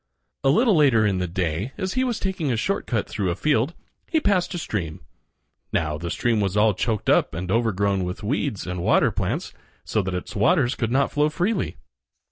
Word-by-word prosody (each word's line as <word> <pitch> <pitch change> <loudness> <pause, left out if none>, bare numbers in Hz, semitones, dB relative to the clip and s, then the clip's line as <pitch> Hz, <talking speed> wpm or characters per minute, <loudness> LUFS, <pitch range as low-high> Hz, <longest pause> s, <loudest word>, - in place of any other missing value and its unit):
A 135 - +4
little 220 - +4
later 135 -8 +4
in 95 -3 +1
the 90 - -1
day, 90 - -2
as 185 0 -2
he 255 - +1
was 245 -3 -1
taking 185 -7 -1
a 115 - 0
short 195 - -1
cut 115 -5 -1
through 100 -4 -2
a 85 - -1
field, 145 - +1 0.3
he 320 - +2
passed 200 - +1
a - - -2
stream. 90 - -4 0.7
Now, 75 -2 -1
the 85 +1 -4
stream 115 +3 +1
was 100 0 0
all 105 0 +4
choked 110 +2 -2
up - - +3
and 90 +2 -4
overgrown 100 -4 +1
with 90 +3 -5
weeds 120 -1 -1
and 90 -1 -4
water - - +3
plants, - - -3 0.3
so 110 - 0
that 95 -1 -3
its 90 - -6
waters 125 - +3
could 115 -2 -2
not 135 +2 +2
flow 150 +1 +2
freely. 185 +7 -1
110 Hz, 205 wpm, -24 LUFS, 95-150 Hz, 0.7 s, A